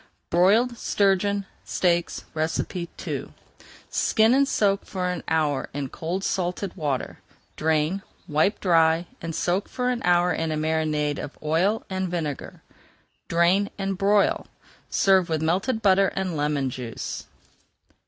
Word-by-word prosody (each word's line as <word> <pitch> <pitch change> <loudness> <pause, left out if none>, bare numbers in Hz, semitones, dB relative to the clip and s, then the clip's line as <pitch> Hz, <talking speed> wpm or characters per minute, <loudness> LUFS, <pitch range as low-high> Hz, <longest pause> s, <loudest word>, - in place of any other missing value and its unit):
BROILED 220 +8 +3
STURGEON 200 0 +1 0.2
STEAKS 175 -2 0
II 165 +2 -3 0.6
Skin 220 +1 +3
and 275 +1 +4
soak 200 -6 +1
for 185 -2 -3
an 180 -2 -3
hour 150 -4 0
in 140 -2 -3
cold 175 +7 -4
salted 180 +1 -1
[Page - - -22
402] - - -11 0.3
water. - - -22 0.3
Drain, 160 +4 +1 0.3
wipe 155 +8 +2
dry, 165 -2 +3 0.2
and 165 -1 -4
soak 180 +3 0
for 250 0 -1
an 245 - -2
hour 175 0 +3
in 165 -1 -1
a 155 - -1
marinade 155 -2 0
of 145 - -7
oil 175 +8 +1
and 190 -1 -2
vinegar. 160 -5 -4 0.6
Drain 175 +4 +3
and 195 -1 -2
broil. 200 +2 +2 0.4
Serve 190 -3 +3
with 160 -1 0
melted 190 +8 0
butter 195 -1 +5
and 190 -3 -2
lemon 145 -3 0
juice. 120 -2 -6
175 Hz, 135 wpm, -25 LUFS, 160-195 Hz, 0.6 s, butter